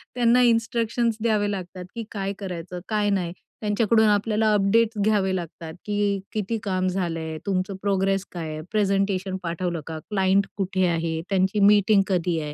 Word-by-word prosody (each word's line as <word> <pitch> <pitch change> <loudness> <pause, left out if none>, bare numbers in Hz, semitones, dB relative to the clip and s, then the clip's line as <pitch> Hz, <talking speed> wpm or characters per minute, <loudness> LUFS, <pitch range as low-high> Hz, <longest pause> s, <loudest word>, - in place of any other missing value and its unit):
त्यांना 245 0 +4
इन्स्ट्रक्शन्स 230 -1 +1
द्यावे 215 -2 +1
लागतात 185 -2 -6
की 230 - -4
काय 195 -1 -3
करायचं? 180 -2 -6
काय 210 -1 +1
नाही? 180 -4 -1 0.3
त्यांच्याकडून 220 +1 +3
आपल्याला 215 +1 +2
अपडेट्स 215 +3 +2
घ्यावे 200 -3 +2
लागतात, 165 -2 -6
की 205 -1 0
"किती 215 +1 -1
काम 185 -2 0
झालं 180 -3 -1
आहे? 160 -1 -5
तुमचं 190 0 -1
प्रोग्रेस 195 -1 +1
काय 165 -3 -5
आहे? 155 0 -5
प्रेझेंटेशन 195 -2 0
पाठवलं 170 -1 -2
का? 160 -1 -5
क्लाइंट 195 -1 +2
कुठे 190 -1 0
आहे? 165 -1 -1
त्यांची 190 +1 +1
मीटिंग 205 0 +5
कधी 175 -3 0
आहे?" 150 -1 -5
195 Hz, 160 wpm, -24 LUFS, 180-210 Hz, 0.3 s, मीटिंग